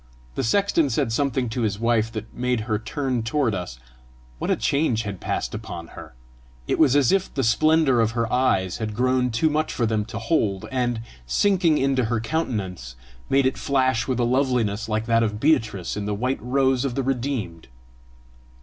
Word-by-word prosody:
The 135 Hz, -, -2 dB
sexton 165 Hz, -, +2 dB
said 130 Hz, 0 st, 0 dB
something 130 Hz, -1 st, 0 dB
to 120 Hz, +2 st, -3 dB
his 105 Hz, -3 st, -1 dB
wife 115 Hz, -1 st, +1 dB
that 110 Hz, 0 st, -7 dB
made 125 Hz, -1 st, -1 dB
her 110 Hz, -1 st, -1 dB
turn 130 Hz, +1 st, -2 dB
toward 120 Hz, 0 st, 0 dB
us. 90 Hz, -10 st, -5 dB, 0.6 s
What -, -, -3 dB
a -, -, +3 dB
change 140 Hz, -6 st, 0 dB
had 100 Hz, -3 st, -6 dB
passed -, -, -2 dB
upon 105 Hz, -6 st, -7 dB
her! -, -, -12 dB, 0.5 s
It -, -, 0 dB
was 145 Hz, -4 st, +5 dB
as 140 Hz, -4 st, +4 dB
if 195 Hz, -1 st, +1 dB
the 135 Hz, -, -2 dB
splendour 150 Hz, +2 st, +3 dB
of 110 Hz, 0 st, +1 dB
her 115 Hz, -, +2 dB
eyes 95 Hz, -8 st, +1 dB
had 110 Hz, -2 st, -4 dB
grown 125 Hz, +1 st, +2 dB
too 115 Hz, +7 st, +1 dB
much 155 Hz, +1 st, 0 dB
for 120 Hz, -, 0 dB
them 110 Hz, -2 st, 0 dB
to 110 Hz, 0 st, -7 dB
hold, 115 Hz, -, 0 dB
and, 120 Hz, -3 st, -1 dB, 0.3 s
sinking 175 Hz, -, +3 dB
into 135 Hz, -2 st, +1 dB
her 115 Hz, 0 st, 0 dB
countenance, 100 Hz, -, -3 dB, 0.3 s
made 135 Hz, 0 st, +3 dB
it 130 Hz, -, 0 dB
flash 130 Hz, -4 st, +1 dB
with 130 Hz, -2 st, -1 dB
a -, -, +2 dB
loveliness 120 Hz, -4 st, 0 dB
like 110 Hz, +1 st, -1 dB
that 115 Hz, 0 st, +3 dB
of 105 Hz, -2 st, -1 dB
Beatrice 115 Hz, -, +1 dB
in 105 Hz, -1 st, -3 dB
the 105 Hz, -, -1 dB
white 125 Hz, +5 st, -2 dB
rose 130 Hz, 0 st, +1 dB
of 135 Hz, -3 st, -2 dB
the 135 Hz, -, -1 dB
redeemed. 125 Hz, -, -3 dB
120 Hz, 190 wpm, -23 LUFS, 110-135 Hz, 0.6 s, was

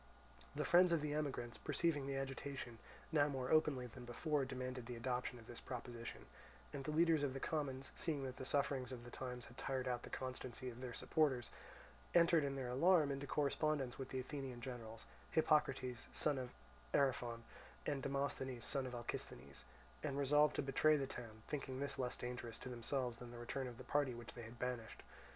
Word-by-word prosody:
The 150 Hz, 0 st, 0 dB
friends 180 Hz, +3 st, +7 dB
of 165 Hz, -3 st, +3 dB
the 150 Hz, -1 st, 0 dB
emigrants, 135 Hz, -6 st, -2 dB
perceiving 150 Hz, -1 st, +1 dB
the 140 Hz, -, -1 dB
agitation, 135 Hz, -3 st, -4 dB, 0.3 s
now 145 Hz, -2 st, +5 dB
more 130 Hz, -3 st, -2 dB
openly 150 Hz, -5 st, +4 dB
than 125 Hz, +1 st, -9 dB
before 140 Hz, +4 st, 0 dB
demanded 130 Hz, -2 st, -4 dB
the 125 Hz, -, -4 dB
adoption 125 Hz, +1 st, -1 dB
of 115 Hz, -, -12 dB
this 120 Hz, 0 st, -8 dB
proposition; 120 Hz, -2 st, -6 dB, 0.5 s
and 140 Hz, -2 st, -3 dB
the 155 Hz, -, -3 dB
leaders 165 Hz, 0 st, +5 dB
of 140 Hz, -2 st, 0 dB
the -, -, -2 dB
commons, 135 Hz, -3 st, -1 dB
seeing 150 Hz, -4 st, 0 dB
that 130 Hz, -1 st, -4 dB
the -, -, -4 dB
sufferings 130 Hz, -2 st, +1 dB
of 125 Hz, -2 st, -6 dB
the 120 Hz, -, -9 dB
times 125 Hz, -2 st, -4 dB
had 120 Hz, -, -12 dB
tired 130 Hz, -1 st, -1 dB
out 125 Hz, -1 st, 0 dB
the -, -, -8 dB
constancy 130 Hz, -1 st, -4 dB
of 120 Hz, +2 st, -10 dB
their 125 Hz, -2 st, -4 dB
supporters, 140 Hz, -7 st, +2 dB, 0.6 s
entered 170 Hz, -2 st, +7 dB
in 140 Hz, -1 st, 0 dB
their 130 Hz, -2 st, -2 dB
alarm 155 Hz, +3 st, +5 dB
into 140 Hz, +1 st, -3 dB
correspondence 145 Hz, -3 st, +1 dB
with 135 Hz, -, -4 dB
the 130 Hz, -, -2 dB
Athenian 130 Hz, -1 st, -4 dB
generals, 115 Hz, -3 st, -6 dB, 0.2 s
Hippocrates, 150 Hz, -6 st, +2 dB
son 145 Hz, -3 st, +2 dB
of 125 Hz, -1 st, -3 dB, 0.5 s
Ariphron, 125 Hz, -4 st, +2 dB, 0.4 s
and 145 Hz, -2 st, 0 dB
Demosthenes, 135 Hz, -2 st, -1 dB
son 135 Hz, -2 st, 0 dB
of 125 Hz, -, -5 dB
Alcisthenes, 120 Hz, -1 st, -5 dB, 0.4 s
and 140 Hz, -3 st, -1 dB
resolved 150 Hz, +2 st, +5 dB
to -, -, +1 dB
betray 150 Hz, +3 st, +5 dB
the 140 Hz, -, 0 dB
town, 110 Hz, -4 st, -8 dB
thinking 135 Hz, -3 st, -3 dB
this 140 Hz, 0 st, -3 dB
less 125 Hz, -1 st, -1 dB
dangerous 120 Hz, -2 st, -4 dB
to 130 Hz, -, -6 dB
themselves 125 Hz, 0 st, -1 dB
than 120 Hz, -, -7 dB
the 120 Hz, -, -8 dB
return 130 Hz, +2 st, -2 dB
of 120 Hz, -2 st, -7 dB
the 130 Hz, -, -8 dB
party 130 Hz, 0 st, +2 dB
which 120 Hz, 0 st, -8 dB
they 120 Hz, -, -7 dB
had 115 Hz, +1 st, -9 dB
banished. 125 Hz, -2 st, -3 dB
130 Hz, 190 wpm, -41 LUFS, 125-145 Hz, 0.6 s, friends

